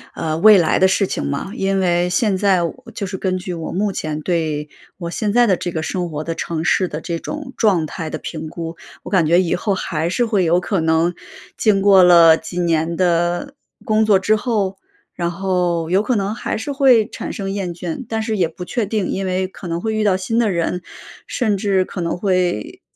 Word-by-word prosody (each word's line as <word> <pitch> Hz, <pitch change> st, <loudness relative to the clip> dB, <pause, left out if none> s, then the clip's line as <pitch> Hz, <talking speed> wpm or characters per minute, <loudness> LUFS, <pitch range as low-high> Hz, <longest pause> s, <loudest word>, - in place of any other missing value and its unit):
呃， 155 Hz, -1 st, -2 dB
未 215 Hz, +4 st, +7 dB
来 165 Hz, -4 st, +2 dB
的 190 Hz, -, +5 dB
事 195 Hz, +1 st, +2 dB
情 -, -, -3 dB
嘛。 140 Hz, +7 st, -3 dB
因 195 Hz, -2 st, 0 dB
为 175 Hz, -1 st, +1 dB
现 195 Hz, +2 st, +1 dB
在 190 Hz, -3 st, +2 dB
我 170 Hz, -, -3 dB, 0.2 s
就 200 Hz, -, -4 dB
是 190 Hz, 0 st, -5 dB
根 185 Hz, 0 st, -1 dB
据 180 Hz, 0 st, -5 dB
我 165 Hz, -2 st, -5 dB
目 205 Hz, +2 st, 0 dB
前 155 Hz, -4 st, -4 dB
对 155 Hz, -3 st, -2 dB, 0.3 s
我 170 Hz, -3 st, -5 dB
现 205 Hz, +3 st, -2 dB
在 240 Hz, 0 st, +5 dB
的 190 Hz, -4 st, +3 dB
这 175 Hz, -, -4 dB
个 160 Hz, -, -3 dB
生 175 Hz, +1 st, -2 dB
活 150 Hz, -1 st, -4 dB
的 165 Hz, -, -3 dB
城 160 Hz, -1 st, -3 dB
市 185 Hz, +2 st, +2 dB
的 155 Hz, -1 st, -6 dB
这 170 Hz, +1 st, -4 dB
种 290 Hz, -, -7 dB
状 190 Hz, -8 st, +2 dB
态 160 Hz, +1 st, -6 dB
的 155 Hz, -, -4 dB
评 160 Hz, -1 st, -6 dB
估， 165 Hz, +1 st, -6 dB, 0.3 s
我 -, -, -7 dB
感 185 Hz, -5 st, +3 dB
觉 170 Hz, +3 st, +4 dB
以 175 Hz, -, 0 dB
后 200 Hz, +3 st, -1 dB
还 165 Hz, -4 st, -2 dB
是 240 Hz, +7 st, +1 dB
会 210 Hz, -5 st, +1 dB
有 170 Hz, +2 st, +3 dB
可 190 Hz, +1 st, -1 dB
能， 160 Hz, +2 st, +2 dB, 0.4 s
经 205 Hz, -3 st, +2 dB
过 195 Hz, -2 st, +6 dB
了 170 Hz, -2 st, +7 dB
几 175 Hz, +2 st, -6 dB
年 165 Hz, -1 st, 0 dB
的， 175 Hz, -, 0 dB, 0.3 s
工 220 Hz, -2 st, +2 dB
作 210 Hz, -2 st, +5 dB
之 215 Hz, +3 st, +2 dB
后， 210 Hz, -4 st, -1 dB, 0.4 s
然 170 Hz, -1 st, -2 dB
后 175 Hz, -2 st, -1 dB
有 190 Hz, +3 st, +3 dB
可 250 Hz, -, 0 dB
能 200 Hz, 0 st, -1 dB
还 225 Hz, -, -3 dB
是 225 Hz, +7 st, -4 dB
会 255 Hz, -6 st, +4 dB
产 -, -, -6 dB
生 195 Hz, -3 st, -4 dB
厌 195 Hz, -3 st, -3 dB
倦， 175 Hz, +7 st, -5 dB
但 225 Hz, -1 st, -2 dB
是 220 Hz, -1 st, -2 dB
也 175 Hz, -3 st, +2 dB
不 165 Hz, +2 st, -9 dB
确 215 Hz, +6 st, -2 dB
定。 205 Hz, -2 st, -2 dB
因 195 Hz, -, -2 dB
为 185 Hz, 0 st, 0 dB
可 190 Hz, -1 st, -10 dB
能 170 Hz, 0 st, -3 dB
会 220 Hz, +2 st, -2 dB
遇 215 Hz, 0 st, 0 dB
到 195 Hz, -3 st, +3 dB
新 190 Hz, +5 st, -1 dB
的 225 Hz, -4 st, +2 dB
人， 175 Hz, +1 st, -2 dB, 0.4 s
甚 215 Hz, -5 st, 0 dB
至 195 Hz, -2 st, +1 dB
可 185 Hz, -, -8 dB
能 170 Hz, -, -2 dB
会 180 Hz, -, -1 dB
185 Hz, 245 characters per minute, -19 LUFS, 170-205 Hz, 0.4 s, 未